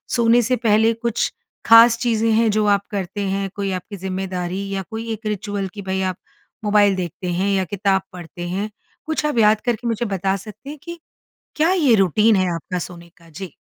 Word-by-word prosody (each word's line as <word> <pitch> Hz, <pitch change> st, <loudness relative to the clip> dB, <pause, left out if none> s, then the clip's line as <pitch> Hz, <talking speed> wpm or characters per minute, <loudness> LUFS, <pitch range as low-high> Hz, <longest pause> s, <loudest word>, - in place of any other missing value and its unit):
सोने 235 Hz, 0 st, +4 dB
से 250 Hz, +3 st, +1 dB
पहले 225 Hz, 0 st, +3 dB
कुछ 230 Hz, 0 st, -1 dB, 0.3 s
खास 230 Hz, 0 st, +8 dB
चीज़ें 225 Hz, -2 st, +1 dB
हैं 225 Hz, 0 st, +3 dB
जो 215 Hz, 0 st, +1 dB
आप 200 Hz, -1 st, +2 dB
करते 200 Hz, 0 st, -4 dB
हैं, 195 Hz, 0 st, -2 dB
कोई 200 Hz, -1 st, -2 dB
आपकी 185 Hz, +3 st, -5 dB
ज़िम्मेदारी 185 Hz, 0 st, -4 dB
या 195 Hz, -, -2 dB
कोई 225 Hz, +1 st, -5 dB
एक 220 Hz, +1 st, -9 dB
रिचुअल 205 Hz, -1 st, -3 dB
कि 205 Hz, -, -7 dB
भई 190 Hz, 0 st, -2 dB
आप 185 Hz, -1 st, -2 dB, 0.5 s
मोबाइल 205 Hz, -2 st, +4 dB
देखते 180 Hz, 0 st, -5 dB
हैं 190 Hz, +3 st, 0 dB
या 195 Hz, -1 st, +1 dB
किताब 195 Hz, 0 st, 0 dB
पढ़ते 175 Hz, 0 st, -8 dB
हैं? 200 Hz, +4 st, -3 dB, 0.4 s
कुछ 315 Hz, -1 st, -2 dB
आप 295 Hz, -5 st, -1 dB
याद 215 Hz, -1 st, +4 dB
करके 240 Hz, 0 st, -1 dB
मुझे 230 Hz, +1 st, -1 dB
बता 195 Hz, -1 st, -1 dB
सकते 215 Hz, +7 st, -11 dB
हैं 300 Hz, -, -7 dB
कि 340 Hz, 0 st, -8 dB, 0.6 s
क्या 320 Hz, +3 st, +3 dB
ये 295 Hz, -11 st, +4 dB
रूटीन 210 Hz, +3 st, +4 dB
है 185 Hz, -1 st, +1 dB
आपका 180 Hz, +2 st, -4 dB
सोने 170 Hz, 0 st, -8 dB
का? 170 Hz, -1 st, -20 dB
जी। 180 Hz, +1 st, -8 dB
205 Hz, 195 wpm, -21 LUFS, 190-230 Hz, 0.6 s, खास